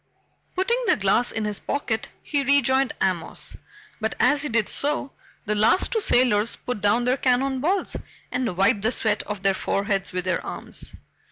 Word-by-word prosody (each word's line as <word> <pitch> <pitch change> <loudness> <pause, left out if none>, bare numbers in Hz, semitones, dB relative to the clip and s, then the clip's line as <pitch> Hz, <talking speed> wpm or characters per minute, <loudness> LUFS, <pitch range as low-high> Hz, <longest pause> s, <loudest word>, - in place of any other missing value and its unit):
Putting 470 +7 0
the - - +5
glass 205 +4 +2
in 220 -1 -2
his 210 -1 0
pocket, 235 -6 -2
he 285 -2 -1
rejoined 270 -1 +2
Amos, 180 -4 0 0.4
but 220 0 -2
as 290 -1 +3
he 295 - -2
did 230 -3 +1
so 285 -1 -2 0.3
the 210 - 0
last 215 - +3
two 460 - +1
sailors 235 - +3
put 250 -5 -5
down 210 +4 +2
their 255 +2 +2
cannon 260 +1 +1
balls 370 +6 0 0.4
and 250 -8 -2
wiped 200 +2 +3
the 220 +3 +1
sweat 220 -4 +1
off 205 -2 -5
their 195 0 +3
foreheads 195 +1 -1
with 180 -1 -3
their 185 - -1
arms. - - -4
230 Hz, 175 wpm, -24 LUFS, 205-275 Hz, 0.4 s, the